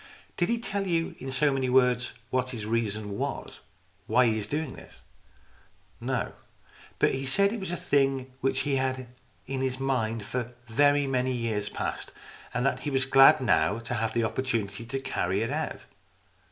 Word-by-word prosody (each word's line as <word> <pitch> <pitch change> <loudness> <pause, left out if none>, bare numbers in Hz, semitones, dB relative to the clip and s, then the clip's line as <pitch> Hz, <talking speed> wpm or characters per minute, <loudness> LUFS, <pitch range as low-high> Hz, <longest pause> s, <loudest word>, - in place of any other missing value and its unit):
" - - -28
Did 175 - +1
he 235 - +2
tell 200 -4 -2
you 165 -2 0
in 135 - -6
so 140 +2 +2
many 130 -1 0
words 125 -1 +3 0.2
what 130 0 +1
his 115 -5 -5
reason 110 -2 -2
was - - -4 0.5
why 125 +3 +4
he 110 -2 +2
is 100 - -4
doing 150 +1 -2
this? - - -14 0.3
" - - -30
" - - -34
No. - - -1 0.6
But - - +3
he 135 0 -3
said 200 +10 +3
it 230 - -3
was 190 - -5
a 175 - -2
thing 135 -3 +1
which 135 0 +1
he 140 -2 +1
had 130 0 +1
had 130 -1 -9 0.4
in 135 -1 -3
his 130 0 -1
mind 115 -5 0
for 120 +3 -4
very 145 +5 +4
many 130 -1 0
years 115 -4 -1
past, - - -4 0.4
and 125 +2 -1
that 140 - +1
he 150 - -3
was 135 -1 +1
glad 135 0 +7
now 85 -3 +3
to 115 +1 -5
have 115 -2 -1
the 115 - +2
opportunity 115 -3 -2
to 135 +3 -3
carry 95 -7 -1
the 105 - +1
idea 115 - -1 0.2
out. - - -16
130 Hz, 200 wpm, -28 LUFS, 115-135 Hz, 0.6 s, glad